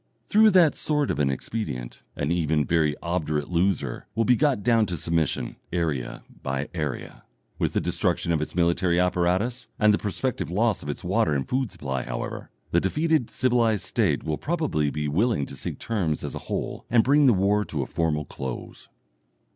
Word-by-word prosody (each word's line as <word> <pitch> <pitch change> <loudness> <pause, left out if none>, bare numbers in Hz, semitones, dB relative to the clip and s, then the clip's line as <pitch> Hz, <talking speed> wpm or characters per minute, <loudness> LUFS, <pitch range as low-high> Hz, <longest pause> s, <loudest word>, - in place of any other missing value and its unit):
Through 220 +1 +6
that 180 -6 +5
sort 150 -2 0
of - - -3
an 70 -2 +2
expedient 65 - -4
an 70 +2 -1
even 80 -3 +1
very 80 -3 +2
obdurate 80 -4 -1
loser 85 -7 0
will 115 +1 +2
be 125 - +5
got 135 -7 +1
down 115 -1 +3
to 90 -2 -3
submission, 80 -6 -1
area 80 -8 -2 0.2
by 70 +2 -3
area. 75 -6 -4 0.4
With - - 0
the - - +1
destruction 85 - 0
of 80 -2 +1
its 75 - -5
military 85 0 +2
apparatus 90 +7 +1
and 105 -1 +5
the - - +1
prospective 105 - -2
loss 105 +3 +1
of 70 - -7
its 75 - -4
water 75 - +1
and 70 - -1
food 130 -3 -1
supply, 65 -2 -3
however, - - -5 0.2
the 85 - +3
defeated 155 - +1
civilized 120 -5 +1
State - - +1
will 80 -1 -2
probably 150 - 0
be 75 +1 -2
willing 95 - +1
to 70 - -8
seek - - -5
terms 90 -10 -1
as - - -4
a - - -4
whole, - - -3
and 115 -2 +5
bring 145 +2 +5
the - - +7
war 100 +2 +2
to 75 -6 -3
a - - -4
formal 75 -1 -1
close. 65 -2 -7
90 Hz, 185 wpm, -25 LUFS, 75-115 Hz, 0.4 s, the